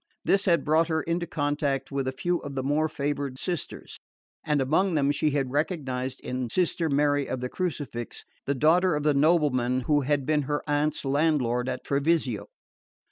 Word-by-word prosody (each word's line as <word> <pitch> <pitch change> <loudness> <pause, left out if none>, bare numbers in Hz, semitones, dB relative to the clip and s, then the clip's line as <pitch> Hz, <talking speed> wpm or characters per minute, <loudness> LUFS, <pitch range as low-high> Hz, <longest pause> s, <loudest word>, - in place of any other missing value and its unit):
This 195 0 +2
had 170 -6 +3
brought 160 +2 +3
her 160 -1 0
into 170 +1 -2
contact 145 -3 -1
with 135 -1 -2
a - - 0
few 175 +6 -1
of 140 -1 -7
the 130 - -2
more 150 +3 +1
favoured 140 -2 -3
sisters, 175 0 -5 0.4
and 150 -2 +1
among 165 +7 +2
them 140 -1 +3
she 145 +1 +1
had 135 -3 -1
recognised 135 -4 -2
in 125 -1 -3
Sister 170 +1 0
Mary 145 0 +2
of 130 - -2
the 125 0 -3
Crucifix 145 -10 -4 0.2
the 140 - +1
daughter 165 +5 +3
of 150 - -2
the 150 -1 +3
nobleman 140 -5 +2
who 145 +3 +2
had 140 0 0
been 150 0 +2
her 145 0 -1
aunt's 145 0 0
landlord 135 -4 +1
at - - -4
Treviso. 140 -5 0
145 Hz, 180 wpm, -27 LUFS, 135-160 Hz, 0.4 s, had